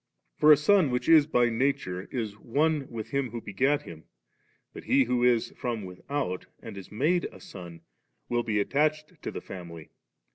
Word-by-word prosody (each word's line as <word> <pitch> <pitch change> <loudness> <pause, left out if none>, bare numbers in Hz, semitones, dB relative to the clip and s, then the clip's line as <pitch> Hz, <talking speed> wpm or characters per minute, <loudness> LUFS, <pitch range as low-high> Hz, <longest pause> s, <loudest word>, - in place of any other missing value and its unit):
For 155 - +6
a 150 - +9
son 180 0 +4
which 125 0 -2
is 155 -3 +7
by 120 -5 +3
nature, 115 -7 -1
is 110 -5 -3
one 150 +3 0
• - - -22
with 115 -3 -7
him 140 -2 0
who 120 +1 -5
begat 135 +8 0
him; 80 -1 -11 0.7
but - - -10
he 135 - +4
who 125 0 0
is 120 -2 +3
from 115 -5 -4
without 90 +1 -4
and - - -9
18 100 +2 -10
made 170 +7 +2
a - - -8
son, 90 - -10 0.5
will 120 0 0
be 110 -3 -1
attached 155 - 0
to - - -4
the - - -6
frunily. 85 -4 -9
125 Hz, 185 wpm, -28 LUFS, 100-145 Hz, 0.7 s, a